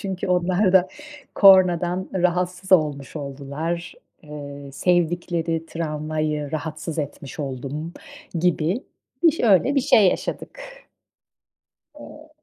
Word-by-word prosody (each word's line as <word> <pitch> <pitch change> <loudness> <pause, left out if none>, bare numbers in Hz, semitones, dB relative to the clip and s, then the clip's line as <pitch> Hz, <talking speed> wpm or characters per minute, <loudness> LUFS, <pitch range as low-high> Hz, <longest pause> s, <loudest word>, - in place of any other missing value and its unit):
Çünkü 190 -3 -4
onlar 180 +2 +2
da, 185 -1 +5 0.5
kornadan 185 -2 +5
rahatsız 180 +1 0
olmuş 150 -5 +2
oldular. 145 +4 -5 0.3
Eee, 145 -2 -9
sevdikleri 170 -1 0
tramvayı, 155 -2 -3
rahatsız 155 +1 -5
etmiş 145 -1 -6
oldum 140 +4 -5 0.5
gibi. 180 +5 0 0.4
İş 330 -2 +4
öyle 230 +5 +4
bir 275 - +3
şey 210 -6 +5
yaşadık. - - -4 1.4
Eee. 300 +1 -12
170 Hz, 95 wpm, -23 LUFS, 150-185 Hz, 1.4 s, da